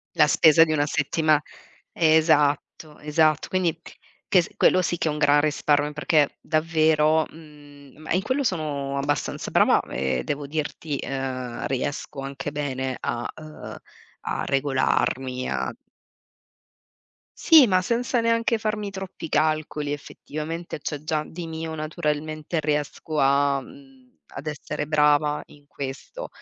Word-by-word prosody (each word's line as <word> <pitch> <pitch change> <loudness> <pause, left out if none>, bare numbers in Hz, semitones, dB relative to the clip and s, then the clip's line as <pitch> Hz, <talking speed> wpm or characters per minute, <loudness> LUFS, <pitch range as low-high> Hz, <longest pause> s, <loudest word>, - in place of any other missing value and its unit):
La - - +5
spesa 160 0 +6
di 160 - 0
una 145 -1 +2
settima 155 0 +2 0.5
Esatto, 155 -1 +2
esatto. 155 0 +2
Quindi, 180 -4 0 0.5
che 185 - +6
s 170 - -7
quello 185 - +4
sì 175 0 -1
che 165 - -1
è - - 0
un 150 - -4
gran 145 -1 +4
risparmio 145 0 +1
perché 150 -1 +1
davvero 155 -1 +2
mhmm, 145 -3 -16
ma 155 - -9
in 185 - +2
quello 260 +7 -1
sono 145 - -2
abbastanza 140 +1 -2
brava, - - +4
e 65 -1 -1
devo 145 0 -3
dirti, 150 0 -3
ehm, 130 -3 -4
riesco 140 +2 -3
anche 135 +1 -5
bene 130 -3 -3
a, 120 0 -3
uhm, 155 -1 -10 0.4
a 70 +3 -3
regolarmi, 130 -2 0
a - - -2 1.7
Sì, 315 -6 +8
ma 185 -2 +3
senza 240 +4 0
neanche 230 0 +2
farmi 215 -1 -2
troppi 190 -4 -7
calcoli 155 -1 0
effettivamente, 155 +3 -6
c'è 150 - -3
già 155 -1 -1
di 170 0 -7
mio 160 0 -5
naturalmente, 155 0 -3
riesco 150 +1 -2
a, 140 0 +3
mhmm, 270 - -17 0.2
ad 145 - -7
essere 150 0 -4
brava 150 -1 +3
in 145 -1 -19
questo. 140 - -7
150 Hz, 135 wpm, -24 LUFS, 145-165 Hz, 1.7 s, Sì